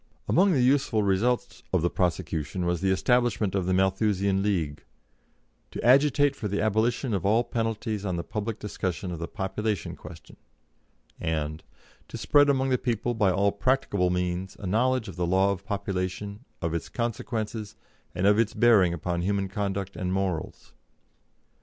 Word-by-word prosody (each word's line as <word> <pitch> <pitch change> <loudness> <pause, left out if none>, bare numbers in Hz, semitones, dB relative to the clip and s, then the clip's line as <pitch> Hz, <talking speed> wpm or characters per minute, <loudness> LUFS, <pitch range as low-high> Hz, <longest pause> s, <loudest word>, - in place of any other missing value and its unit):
Among 195 +3 +4
the 135 -7 +3
useful 125 -5 +2
results 100 +6 0
of - - +1
the 85 - +3
prosecution 85 -1 -1
was 85 -1 0
the 95 - +1
establishment 110 0 +2
of 95 -2 -1
the 95 - +2
Malthusian 95 0 +1
League, 85 -8 -1 0.9
"to - - -6
agitate 140 +2 +4
for 105 - -4
the 100 +1 -2
abolition 110 +3 +1
of 95 -4 -1
all 110 +4 +3
penalties 115 -3 -2
on 95 -3 -2
the 85 - -3
public 110 +3 -4
discussion 95 -3 -4
of 85 - -5
the 85 - -4
population 105 +1 -3
question," - - -13 0.8
and 80 -2 -2 0.4
"to - - -7
spread 145 0 +4
among 135 -1 +2
the 125 -1 +2
people, 120 -1 -1
by 105 -4 +2
all 100 +2 +2
practicable 100 -4 +1
means, 90 +1 -2
a 105 - -7
knowledge 120 +4 +1
of - - -9
the 90 -1 0
law 95 +2 +3
of 100 0 -4
population, 100 +2 -3 0.2
of 85 -1 -1
its 85 - -3
consequences, 110 -2 -3 0.4
and 90 - 0
of 105 +2 +5
its 115 -2 +1
bearing 105 -8 +5
upon 85 +1 -2
human 100 +1 0
conduct 100 -1 -3
and 90 0 -3
morals." 95 -4 -3
100 Hz, 165 wpm, -27 LUFS, 90-115 Hz, 0.9 s, of